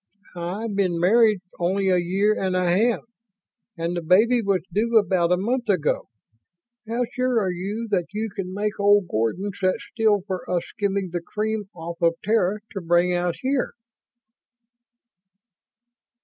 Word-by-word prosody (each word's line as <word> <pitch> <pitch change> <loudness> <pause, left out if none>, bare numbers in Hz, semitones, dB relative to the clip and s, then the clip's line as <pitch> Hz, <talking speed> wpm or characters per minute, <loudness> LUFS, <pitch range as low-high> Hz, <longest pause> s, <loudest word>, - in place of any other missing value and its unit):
"I've 190 +6 -4
been 185 -4 +1
married 210 +2 +4 0.2
only 190 +2 +1
a 180 -1 +4
year 195 +5 +2
and 190 -3 -1
a 185 0 +1
half, 210 +7 +2 0.8
and 165 +1 -2
the 175 - -2
baby 220 +9 +4
was 195 -5 0
due 230 +3 +2
about 185 -5 +2
a 180 - +4
month 235 +4 -1
ago. 180 -7 0 0.8
How 235 +2 0
sure 255 -2 +1
are 190 -4 0
you 200 +6 -4
that 180 -4 +1
you 215 +1 -3
can 185 -2 -4
make 205 +2 -3
old 205 -1 +4
Gordon 165 - -1
sit 185 0 +1
still 215 -4 +1
for 185 -3 -4
us 180 -1 0
skimming 200 -2 -2
the 175 0 -2
cream 215 +3 -3
off 170 0 -7
of 165 -1 +3
Terra 210 -1 +1
to 195 -3 -5
bring 175 +1 +2
out 175 -1 0
here?" 260 0 0
195 Hz, 155 wpm, -24 LUFS, 180-215 Hz, 0.8 s, married